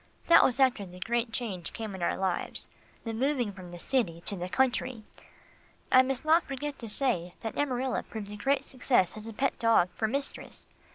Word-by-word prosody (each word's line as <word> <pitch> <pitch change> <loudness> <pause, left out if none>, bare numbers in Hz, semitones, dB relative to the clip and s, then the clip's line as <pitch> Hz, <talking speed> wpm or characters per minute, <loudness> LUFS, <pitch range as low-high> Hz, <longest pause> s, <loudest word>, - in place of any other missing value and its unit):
That 335 0 +7
was 255 +1 +2
after 260 -6 +3
the 180 -1 -11
great 235 +4 -1
change 200 -8 -4
came 220 -3 -5
in 190 - -7
our 170 - 0
lives 190 -2 -2 0.4
the 225 - -4
moving 250 -2 0
from 185 -2 -10
the 175 - -8
city 175 -5 0
to 200 - -4
the 180 0 -5
country. 255 -1 0 0.9
I 255 - +8
must 260 +2 -2
not 320 +2 +5
forget 280 +1 -5
to 230 - -5
say 185 -8 +1
that 225 -2 -4
Amarilla 260 -2 0
proved 210 -2 -8
a - - -6
great 275 +6 0
success 245 -8 +1
as 215 +1 -8
a 225 - -6
pet 270 +5 -1
dog 225 -6 +4
for 220 - 0
mistress. 275 +5 -5
230 Hz, 195 wpm, -29 LUFS, 195-265 Hz, 0.9 s, I